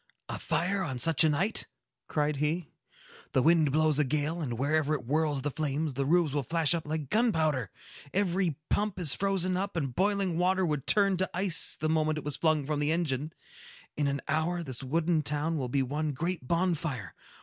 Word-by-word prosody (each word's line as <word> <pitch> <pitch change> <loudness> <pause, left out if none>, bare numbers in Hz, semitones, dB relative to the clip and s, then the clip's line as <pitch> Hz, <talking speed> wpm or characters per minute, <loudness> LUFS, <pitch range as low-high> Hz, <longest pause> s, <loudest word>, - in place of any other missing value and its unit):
"A - - -4
fire 190 +3 0
on 135 -9 -3
such 165 +6 +5
a 160 - +4
night!" 175 +9 +2 0.4
cried 150 -1 0
he. 150 +3 -2 0.6
"The 130 - +3
wind 160 -3 +4
blows 155 0 +2
a - - +4
gale, 150 +4 -1
and 120 -6 -3
wherever 150 +3 +1
it 140 - -4
whirls 145 0 0
the 145 - -1
flames, 150 0 -2
the 135 +1 -2
roofs 165 -2 +2
will 145 - 0
flash 165 +3 +2
up 165 -3 -3
like 155 -3 -4
gunpowder. 160 - +1 0.4
Every 185 -4 0 0.2
pump 210 -2 0
is 165 -6 +2
frozen 185 -2 0
up, 195 +1 -3
and 140 -6 -2
boiling 195 0 0
water 185 +1 +2
would 150 -5 -2
turn 200 -2 +3
to 185 +1 0
ice 180 -3 +1
the 155 - 0
moment 155 -1 +1
it 155 - -5
was 150 -1 -2
flung 155 -3 +1
from 150 0 -2
the 150 +1 +1
engine. 155 -3 -1 0.6
In 145 -1 0
an 140 0 -2
hour, 160 +3 0
this 130 -6 -7
wooden 160 +4 +1
town 150 +3 -1
will 130 -2 -3
be 135 +2 +1
one 150 +3 -2
great 165 -1 -3
bonfire! 165 - -1
155 Hz, 195 wpm, -29 LUFS, 145-175 Hz, 0.6 s, such